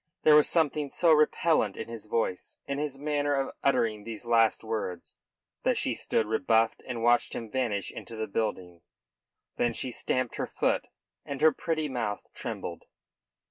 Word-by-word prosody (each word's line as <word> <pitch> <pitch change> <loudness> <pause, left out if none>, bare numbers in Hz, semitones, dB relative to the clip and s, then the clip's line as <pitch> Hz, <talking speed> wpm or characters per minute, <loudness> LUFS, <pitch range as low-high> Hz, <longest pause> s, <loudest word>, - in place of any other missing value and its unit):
There 155 - +7
was 150 - +6
something 150 -3 +1
so 170 +3 +3
repellent 155 - +3
in - - -5
his 115 -2 -8
voice, 105 -5 -2
in 140 0 -3
his 145 -2 -3
manner 145 0 0
of 135 0 -1
uttering 115 -6 +1
those 115 +1 -7
last 115 -2 +3
words, 110 -6 -4 0.5
that - - +1
she - - +1
stood 110 - 0
rebuffed 110 0 +2
and 120 -3 -4
watched 120 +1 +3
him 115 -2 -6
vanish 115 -7 -1
into 115 - -8
the 110 0 -2
building. 95 -5 -3 0.8
Then 120 -1 +1
she 125 - -3
stamped 130 0 -2
her - - -2
foot - - 0 0.4
and 140 -1 -5
her 160 0 +7
pretty 160 -1 -2
mouth 115 -6 -3
trembled. - - -6
120 Hz, 165 wpm, -28 LUFS, 110-145 Hz, 0.8 s, There